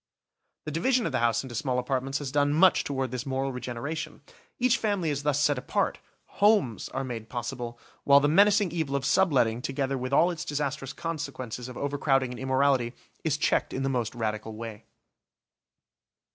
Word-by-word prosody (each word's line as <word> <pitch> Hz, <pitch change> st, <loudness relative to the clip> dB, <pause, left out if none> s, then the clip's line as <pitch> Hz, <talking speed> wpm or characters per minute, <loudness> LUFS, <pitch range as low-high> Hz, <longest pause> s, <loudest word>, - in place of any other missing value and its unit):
The 155 Hz, -, -4 dB
division 235 Hz, -, +1 dB
of -, -, -1 dB
the 130 Hz, -, 0 dB
house 115 Hz, 0 st, +2 dB
into 130 Hz, -3 st, -8 dB
small 125 Hz, +2 st, -1 dB
apartments 130 Hz, +2 st, -1 dB
has 145 Hz, -3 st, -5 dB
done 145 Hz, 0 st, +2 dB
much 185 Hz, +4 st, +5 dB
toward 135 Hz, -3 st, -2 dB
this 125 Hz, +1 st, -4 dB
moral 135 Hz, 0 st, -1 dB
regeneration. 140 Hz, +6 st, -5 dB, 0.4 s
Each 250 Hz, -1 st, +3 dB
family 200 Hz, -7 st, 0 dB
is 140 Hz, -1 st, -2 dB
thus 145 Hz, -1 st, +1 dB
set 145 Hz, -3 st, +2 dB
apart, -, -, -1 dB, 0.3 s
homes 200 Hz, -, +2 dB
are 135 Hz, -, -3 dB
made 115 Hz, -4 st, -6 dB
possible, 120 Hz, -1 st, -5 dB, 0.3 s
while 140 Hz, 0 st, +7 dB
the 145 Hz, -, +2 dB
menacing 200 Hz, +4 st, +4 dB
evil 160 Hz, -5 st, -2 dB
of 135 Hz, -1 st, -1 dB
subletting 125 Hz, -11 st, +3 dB
together 135 Hz, 0 st, -2 dB
with 130 Hz, +1 st, -4 dB
all 165 Hz, +6 st, +4 dB
its 170 Hz, -, -5 dB
disastrous 145 Hz, -2 st, -3 dB
consequences 140 Hz, -7 st, -5 dB
of 125 Hz, -, -9 dB
overcrowding 140 Hz, -2 st, +1 dB
and 125 Hz, -, -7 dB
immorality 130 Hz, -2 st, +2 dB, 0.3 s
is 155 Hz, -2 st, +1 dB
checked -, -, +1 dB
in 135 Hz, -, -2 dB
the 135 Hz, -, 0 dB
most 125 Hz, -3 st, -2 dB
radical 110 Hz, -1 st, -3 dB
way. 115 Hz, -1 st, -8 dB
135 Hz, 175 wpm, -27 LUFS, 125-150 Hz, 0.4 s, while